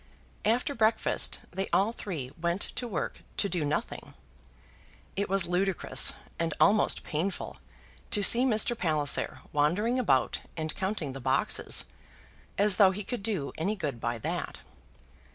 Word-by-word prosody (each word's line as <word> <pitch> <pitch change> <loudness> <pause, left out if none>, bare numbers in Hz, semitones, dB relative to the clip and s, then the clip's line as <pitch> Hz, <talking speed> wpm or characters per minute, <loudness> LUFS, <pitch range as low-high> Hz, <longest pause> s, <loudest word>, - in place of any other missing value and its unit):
After 240 +6 +1
breakfast 225 -3 +1
they 190 +2 -3
all 205 +3 +2
three 155 - -5
went 170 +3 0
to 245 - -3
work 195 -8 -4 0.2
to 200 - +2
do 175 -4 -1
nothing. 145 +1 -3 1.0
It 200 +1 -1
was 195 -1 +1
ludicrous 180 +1 +2 0.2
and 165 -2 -1
almost 210 +1 +3
painful 180 +4 -3 0.5
to 205 - +3
see 240 +5 +6
Mr. 240 -1 +3
Palliser 155 -8 +1
wandering 190 - +1
about 135 - +2 0.2
and 155 -1 -3
counting 190 -8 -3
the 135 - -8
boxes, - - +1 0.7
as 200 -1 +3
though 195 -2 +7
he 200 +2 -4
could 245 +1 -4
do 195 -9 -1
any 195 +7 0
good 145 - -4
by 120 0 -1
that. 115 - -4
190 Hz, 140 wpm, -29 LUFS, 155-210 Hz, 1.0 s, though